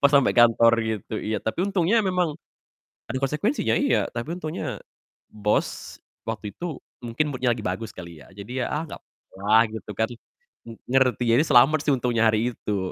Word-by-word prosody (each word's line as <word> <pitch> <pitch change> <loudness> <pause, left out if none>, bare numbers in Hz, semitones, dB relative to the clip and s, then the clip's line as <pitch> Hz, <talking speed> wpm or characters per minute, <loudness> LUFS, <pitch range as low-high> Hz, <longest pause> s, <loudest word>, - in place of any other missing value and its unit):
pas 140 - +6
sampai 140 -2 +4
kantor 115 -1 +5
gitu, 110 -1 -4
iya. 110 0 -2
Tapi 110 - -2
untungnya 195 +2 +2
memang 180 -5 0 0.8
ada 130 - -3
konsekuensinya, 150 - 0
iya. 280 - +2
Tapi 130 +9 -4
untungnya 155 - -4 0.5
bos 105 0 -2 0.3
waktu 105 -2 -5
itu 170 -2 -5 0.2
mungkin 120 +6 -1
mood-nya 125 -1 +1
lagi 115 -2 -2
bagus 115 0 -3
kali 85 -4 -11
ya. - - -18
Jadi 105 +7 -5
ya, - - -3
"Ah, 150 - -1
nggak - - -9
apa-apa - - -34
lah," 110 +2 +5
gitu 110 - -7
kan. 110 0 +2 0.6
Ng 115 -1 -9
ngerti, 125 -2 +2
ya 115 - +5 0.2
selamat 140 +4 +6
sih 150 - +2
untungnya 120 -2 0
hari 115 +3 0
itu. 105 -2 -3
120 Hz, 175 wpm, -24 LUFS, 110-150 Hz, 0.8 s, pas